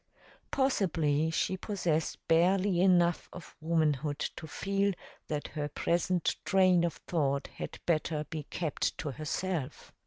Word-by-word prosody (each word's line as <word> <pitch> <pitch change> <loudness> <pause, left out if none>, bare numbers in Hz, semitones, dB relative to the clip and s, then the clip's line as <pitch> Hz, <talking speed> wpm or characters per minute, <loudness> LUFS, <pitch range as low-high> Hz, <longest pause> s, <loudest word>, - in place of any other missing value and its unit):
Possibly 165 - +1
she 185 +3 0
possessed 175 -6 -2
barely 180 +2 +3
enough 175 -2 +3
of 180 - -11
womanhood 155 -3 +1 0.2
to 160 - -8
feel 200 +3 0 0.3
that 150 -1 -3
her 150 -1 -3
present 175 +3 0
train 185 -3 +4
of 170 -2 +1
thought 140 -4 0
had - - -5
better 155 -2 0
be 160 -2 -3
kept 160 -5 -2
to 145 - -3
herself. 155 0 -3
170 Hz, 125 wpm, -31 LUFS, 155-185 Hz, 0.3 s, train